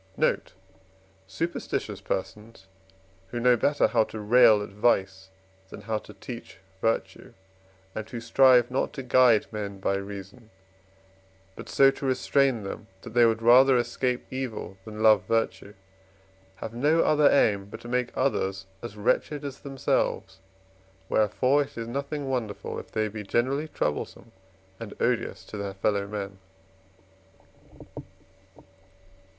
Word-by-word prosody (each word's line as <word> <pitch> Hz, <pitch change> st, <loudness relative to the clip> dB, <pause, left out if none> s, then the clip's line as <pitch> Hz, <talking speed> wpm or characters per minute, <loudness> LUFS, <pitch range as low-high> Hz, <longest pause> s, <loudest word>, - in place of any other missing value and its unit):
Note. -, -, 0 dB, 0.7 s
Superstitions 165 Hz, -, -4 dB
persons, 105 Hz, +1 st, -5 dB, 0.6 s
who 120 Hz, +5 st, -5 dB
know 125 Hz, +1 st, +5 dB
better 145 Hz, +5 st, +2 dB
how 115 Hz, -2 st, +3 dB
to 110 Hz, -, -8 dB
rail 110 Hz, -1 st, +5 dB
at -, -, -8 dB
vice 95 Hz, -3 st, 0 dB, 0.4 s
than -, -, -10 dB
how 110 Hz, +1 st, -2 dB
to -, -, -14 dB
teach 120 Hz, -5 st, -9 dB, 0.2 s
virtue, 115 Hz, 0 st, -2 dB, 0.6 s
and 110 Hz, 0 st, -6 dB
who 120 Hz, -, -5 dB
strive 125 Hz, +1 st, +4 dB
not 130 Hz, -, -1 dB
to 135 Hz, -, -6 dB
guide 125 Hz, -4 st, +4 dB
men 100 Hz, -2 st, -5 dB
by 95 Hz, -, 0 dB
reason, 100 Hz, +3 st, -9 dB, 1.1 s
but -, -, -10 dB
so 135 Hz, 0 st, +5 dB
to 140 Hz, -, -7 dB
restrain 130 Hz, -2 st, +1 dB
them 100 Hz, +2 st, -7 dB, 0.2 s
that 115 Hz, -, -9 dB
they 120 Hz, -1 st, +6 dB
would 115 Hz, 0 st, -1 dB
rather 130 Hz, +2 st, +7 dB
escape 125 Hz, +1 st, -1 dB
evil 125 Hz, -7 st, -5 dB
than 110 Hz, 0 st, -6 dB
love 105 Hz, -4 st, +5 dB
virtue, 115 Hz, -2 st, -1 dB, 0.8 s
have 110 Hz, +4 st, -7 dB
no 150 Hz, +7 st, +2 dB
other 150 Hz, -1 st, +4 dB
aim 100 Hz, -7 st, +3 dB
but 100 Hz, -, -10 dB
to -, -, -10 dB
make 125 Hz, 0 st, 0 dB
others 95 Hz, 0 st, -1 dB, 0.2 s
as 115 Hz, -3 st, -8 dB
wretched 145 Hz, +7 st, 0 dB
as 140 Hz, -1 st, -6 dB
themselves; 135 Hz, -7 st, -2 dB, 0.7 s
wherefore 125 Hz, +7 st, +2 dB
it 140 Hz, -, -6 dB
is 115 Hz, -1 st, -4 dB
nothing 140 Hz, +3 st, -4 dB
wonderful, 120 Hz, -6 st, -3 dB
if -, -, -11 dB
they 110 Hz, 0 st, 0 dB
be 105 Hz, 0 st, -7 dB
generally 130 Hz, +8 st, 0 dB
troublesome 115 Hz, -, -4 dB, 0.5 s
and 115 Hz, -3 st, -8 dB
odious 105 Hz, -6 st, -1 dB
to 105 Hz, -, -8 dB
their 100 Hz, -1 st, -5 dB
fellow 100 Hz, 0 st, 0 dB
men. 100 Hz, -2 st, -6 dB
115 Hz, 135 wpm, -26 LUFS, 105-130 Hz, 1.1 s, rather